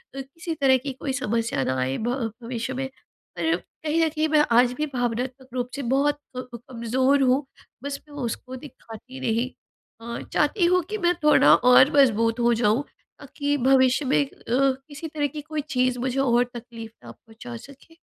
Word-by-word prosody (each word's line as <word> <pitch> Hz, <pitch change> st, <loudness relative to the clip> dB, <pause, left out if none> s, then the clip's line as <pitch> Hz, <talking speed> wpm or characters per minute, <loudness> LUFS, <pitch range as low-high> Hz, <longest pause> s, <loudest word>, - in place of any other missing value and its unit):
किसी 280 Hz, +5 st, -6 dB
तरह 270 Hz, -3 st, +4 dB
की 275 Hz, -, -2 dB
कोई 265 Hz, +1 st, -4 dB
समस्या 230 Hz, -, -1 dB
न -, -, -2 dB
आए 130 Hz, +1 st, -1 dB
भ 240 Hz, +1 st, -2 dB
भविष्य 235 Hz, +1 st, -4 dB
में। 265 Hz, +1 st, -3 dB, 0.5 s
पर 165 Hz, -1 st, +1 dB
कहीं 315 Hz, -, -3 dB
न -, -, +1 dB
कहीं 310 Hz, 0 st, 0 dB
मैं 300 Hz, -1 st, +4 dB
आज 245 Hz, +1 st, +5 dB
भी 300 Hz, +4 st, -2 dB
भावनात्मक 250 Hz, +2 st, -3 dB
रूप 250 Hz, -1 st, -2 dB
से 280 Hz, -, -4 dB
बहुत 290 Hz, +1 st, +1 dB, 0.2 s
कम 250 Hz, -1 st, -7 dB
कमज़ोर 255 Hz, +3 st, 0 dB
हूँ 265 Hz, +2 st, +2 dB, 0.4 s
बस 280 Hz, 0 st, -4 dB
मैं 290 Hz, -, -13 dB
उसको 255 Hz, +2 st, -5 dB
दिखाती 255 Hz, -1 st, -11 dB
नहीं। 240 Hz, 0 st, 0 dB, 0.5 s
अ, 235 Hz, +1 st, -6 dB
चाहती 325 Hz, +5 st, +2 dB
हूँ 365 Hz, +1 st, +3 dB
कि 430 Hz, -, -2 dB
मैं 350 Hz, -3 st, +2 dB
थोड़ा 300 Hz, -, +6 dB
और 250 Hz, +3 st, +6 dB
मज़बूत 230 Hz, -3 st, +3 dB
हो 240 Hz, 0 st, +3 dB
जाऊँ 225 Hz, +3 st, +2 dB, 0.4 s
ताकि 290 Hz, 0 st, -2 dB
भविष्य 260 Hz, +1 st, +3 dB
में 265 Hz, -, +2 dB
अ, 275 Hz, -, -16 dB, 0.2 s
किसी 275 Hz, +4 st, -1 dB
तरह 295 Hz, -2 st, -1 dB
की 295 Hz, +2 st, -7 dB
कोई 310 Hz, 0 st, -4 dB
चीज़ 255 Hz, -3 st, +1 dB
मुझे 260 Hz, +1 st, -1 dB
और 245 Hz, -2 st, +3 dB
तकलीफ़ 230 Hz, -2 st, -9 dB
ना -, -, -9 dB
पहुँचा 230 Hz, +2 st, -11 dB
सके। 280 Hz, +6 st, -16 dB
260 Hz, 180 wpm, -24 LUFS, 235-285 Hz, 0.5 s, थोड़ा